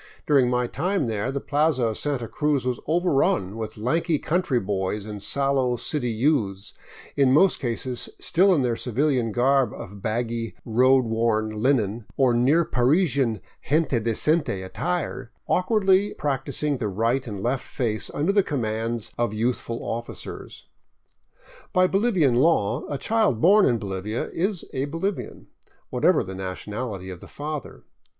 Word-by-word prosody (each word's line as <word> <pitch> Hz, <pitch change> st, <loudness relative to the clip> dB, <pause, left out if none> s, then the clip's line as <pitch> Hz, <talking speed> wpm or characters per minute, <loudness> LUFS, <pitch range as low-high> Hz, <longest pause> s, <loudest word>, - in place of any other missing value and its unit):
During 135 Hz, -4 st, +4 dB
my 125 Hz, 0 st, +1 dB
time 180 Hz, +6 st, -1 dB
there 110 Hz, +2 st, -2 dB
the 140 Hz, -, -2 dB
plaza 145 Hz, -2 st, +1 dB
of 110 Hz, -, -4 dB
Santa 140 Hz, -6 st, -1 dB
Cruz 150 Hz, -2 st, 0 dB
was 125 Hz, -1 st, -1 dB
overrun 145 Hz, -, +1 dB
with 110 Hz, -1 st, -6 dB
lank 125 Hz, +12 st, 0 dB, 0.2 s
country 165 Hz, -7 st, +1 dB
boys 100 Hz, 0 st, -2 dB
and 105 Hz, -2 st, -7 dB
sallow 135 Hz, +1 st, +1 dB
city 125 Hz, +1 st, -2 dB
youths, 110 Hz, -5 st, 0 dB, 0.4 s
in 135 Hz, -2 st, +4 dB
most 170 Hz, +7 st, +4 dB
cases 120 Hz, 0 st, -3 dB
still 190 Hz, +3 st, +3 dB
in 155 Hz, -7 st, +3 dB
their 120 Hz, -2 st, +1 dB
civilian 125 Hz, -1 st, 0 dB
garb 130 Hz, +3 st, +2 dB
of 100 Hz, +1 st, -9 dB
baggy, 115 Hz, +1 st, -2 dB
road 130 Hz, +3 st, +4 dB
worn 110 Hz, -1 st, 0 dB
linen 110 Hz, -1 st, 0 dB
or 130 Hz, -3 st, +4 dB
near 140 Hz, +8 st, +3 dB
Parisian 135 Hz, -, +1 dB, 0.3 s
gente 150 Hz, -4 st, +2 dB
decente 115 Hz, -, 0 dB
attire, 150 Hz, -, -3 dB, 0.2 s
awkwardly 195 Hz, +1 st, +2 dB
practicing 140 Hz, 0 st, -1 dB
the 115 Hz, -4 st, -2 dB
right 115 Hz, +7 st, 0 dB
and 105 Hz, -3 st, -5 dB
left 125 Hz, +6 st, -1 dB
face 110 Hz, -4 st, -2 dB
under 155 Hz, +7 st, 0 dB
the 200 Hz, 0 st, +4 dB
commands 115 Hz, -, -2 dB
of 120 Hz, -3 st, 0 dB
youthful 115 Hz, +1 st, -2 dB
officers. 120 Hz, +1 st, -6 dB, 1.1 s
By 185 Hz, 0 st, +5 dB
Bolivian 190 Hz, -, +2 dB
law 125 Hz, -3 st, +2 dB
a 145 Hz, -, -1 dB
child 215 Hz, -, +1 dB
born 195 Hz, -, +6 dB
in 120 Hz, -, +2 dB
Bolivia 100 Hz, +2 st, -4 dB
is 185 Hz, +1 st, -2 dB
a 135 Hz, +1 st, -1 dB
Bolivian, 165 Hz, +7 st, -4 dB, 0.5 s
what -, -, -4 dB
ever -, -, +4 dB
the 95 Hz, -, -7 dB
nationality 95 Hz, +1 st, -5 dB
of 90 Hz, -, -9 dB
the -, -, -12 dB
father. 150 Hz, -2 st, -6 dB
125 Hz, 145 wpm, -24 LUFS, 110-150 Hz, 1.1 s, born